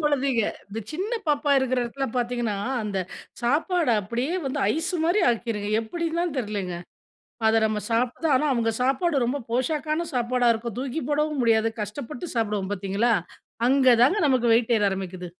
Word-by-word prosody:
குழந்தைங்க 275 Hz, -6 st, +1 dB, 0.3 s
இந்த 215 Hz, +3 st, -6 dB
சின்ன 380 Hz, +8 st, -3 dB, 0.2 s
பாப்பா 290 Hz, 0 st, +1 dB
இருக்கிற 255 Hz, -1 st, 0 dB
இடத்துல 270 Hz, +3 st, -3 dB
பார்த்தீங்கன்னா, 240 Hz, -3 st, -1 dB, 0.3 s
அந்த 200 Hz, -2 st, -2 dB, 0.4 s
சாப்பாடு 310 Hz, +2 st, +2 dB
அப்டியே 240 Hz, -, -2 dB
வந்து 265 Hz, -, -2 dB, 0.2 s
ஐஸ் 325 Hz, +3 st, -2 dB
மாரி 350 Hz, +5 st, +3 dB
ஆக்கிருங்க 220 Hz, -3 st, -2 dB
எப்டின்னு 335 Hz, +8 st, -3 dB
தான் 345 Hz, -4 st, -1 dB
தெரியலங்க. 200 Hz, -6 st, -3 dB, 0.7 s
அத 220 Hz, 0 st, +4 dB
நம்ம 215 Hz, -1 st, -1 dB
சாப்பிட 245 Hz, +7 st, 0 dB
ஆனா, 300 Hz, -, +1 dB
அவங்க 230 Hz, -1 st, +1 dB
சாப்பாடு 275 Hz, 0 st, +1 dB
ரொம்ப 275 Hz, +3 st, -1 dB
போஷாக்கான 305 Hz, +6 st, -1 dB
சாப்பாடா 245 Hz, 0 st, +1 dB
இருக்கும். 230 Hz, -1 st, -5 dB
தூக்கி 270 Hz, +3 st, -3 dB
போடவும் 300 Hz, -1 st, 0 dB
முடியாது 225 Hz, -1 st, +3 dB
கஷ்டப்பட்டு 245 Hz, -, -6 dB
சாப்பிடுவோம் 210 Hz, -4 st, -1 dB
பார்த்தீங்களா? 200 Hz, +4 st, 0 dB, 0.6 s
அங்கதாங்க 260 Hz, -, +5 dB
நமக்கு 245 Hz, -3 st, +3 dB
வெயிட் 235 Hz, 0 st, +2 dB
ஏற 205 Hz, -, +1 dB
ஆரம்பிக்குது. 185 Hz, -2 st, -5 dB
245 Hz, 150 wpm, -25 LUFS, 220-290 Hz, 0.7 s, அங்கதாங்க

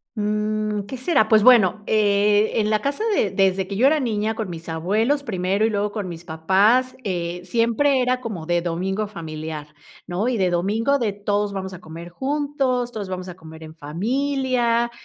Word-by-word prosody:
Mm, 210 Hz, 0 st, -1 dB
¿Qué 260 Hz, -, -6 dB
será? 255 Hz, -4 st, +2 dB
Pues, 220 Hz, -1 st, +6 dB
bueno, 215 Hz, -4 st, +5 dB
eh, 210 Hz, 0 st, +3 dB
en 210 Hz, -, +1 dB
la 215 Hz, -1 st, +1 dB
casa 280 Hz, +7 st, -2 dB
de 200 Hz, -, +1 dB
desde 190 Hz, -1 st, +2 dB
que 195 Hz, +1 st, -5 dB
yo 255 Hz, -, +5 dB
era 305 Hz, +1 st, +3 dB
niña, 220 Hz, -2 st, -1 dB
con 220 Hz, -5 st, -4 dB
mis 165 Hz, -1 st, -8 dB
abuelos, 215 Hz, -, 0 dB
primero, 195 Hz, -2 st, 0 dB
y -, -, +2 dB
luego 205 Hz, -1 st, -1 dB
con 200 Hz, -5 st, -4 dB
mis 170 Hz, 0 st, -9 dB
papás, 195 Hz, +10 st, +2 dB
eh, 175 Hz, -2 st, -3 dB
siempre 235 Hz, +6 st, +2 dB
era 250 Hz, 0 st, +1 dB
como 210 Hz, -10 st, -6 dB
de 175 Hz, 0 st, +1 dB
domingo 190 Hz, +5 st, -2 dB
familiar, 155 Hz, -5 st, -7 dB, 0.3 s
¿no? 180 Hz, +6 st, -1 dB
Y 255 Hz, -, +1 dB
de 185 Hz, -3 st, +2 dB
domingo 215 Hz, +10 st, +1 dB
de 215 Hz, -4 st, -1 dB
todos 205 Hz, 0 st, -1 dB
vamos 190 Hz, -1 st, -5 dB
a 185 Hz, -, -9 dB
comer 170 Hz, 0 st, -10 dB
juntos, 270 Hz, -, -1 dB
todos 210 Hz, -4 st, -5 dB
vamos 185 Hz, 0 st, -5 dB
a 175 Hz, -, -8 dB
comer 160 Hz, -2 st, -12 dB
en 155 Hz, -, -10 dB
familia, 235 Hz, -, 0 dB
210 Hz, 185 wpm, -22 LUFS, 180-235 Hz, 0.3 s, Pues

